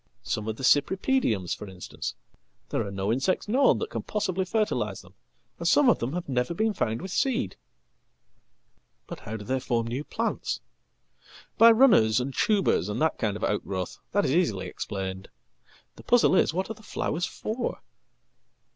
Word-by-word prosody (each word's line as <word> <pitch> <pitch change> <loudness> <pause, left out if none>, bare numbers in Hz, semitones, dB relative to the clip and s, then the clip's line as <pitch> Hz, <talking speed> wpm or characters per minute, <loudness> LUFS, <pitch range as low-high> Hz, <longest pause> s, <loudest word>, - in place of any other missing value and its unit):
Some 105 0 -3
of 110 - -2
theCypripediums, 140 - +2
for 105 - -9
instance; 90 -1 -6 0.5
there - - 0
are 100 - -5
no 100 +2 -1
insects 135 - 0
known 260 +6 +4
that - - -4
can - - -3
possiblyfertilise 205 +1 -1
them, - - -18 0.5
and - - -2
some 290 -3 +5
of - - +3
them 120 +5 -3
have 175 0 -4
never 130 +4 -1
been 220 +3 +1
found 115 - -2
with 190 - -6 2.0
seed.""But - - -6
how 110 +1 -6
do 105 - -9
they 130 +3 0
form 120 -2 -1
new 125 +5 -3
plants?""By 230 +2 -1
runners 220 - +5
and 130 +2 -3
tubers, 195 - +2
and 105 - -3
that 160 +1 +1
kind 105 -3 -1
of - - -8
outgrowth. 95 -3 -2
That 205 - +2
is 130 - +1 0.2
easilyexplained. 95 -1 -5 0.7
The - - -12
puzzle 240 -5 +4
is, - - +4
what 190 +6 -2
are - - -2
the 220 - -18
flowers 175 -4 -2
for?" 230 +3 -4
135 Hz, 155 wpm, -27 LUFS, -, 2.0 s, some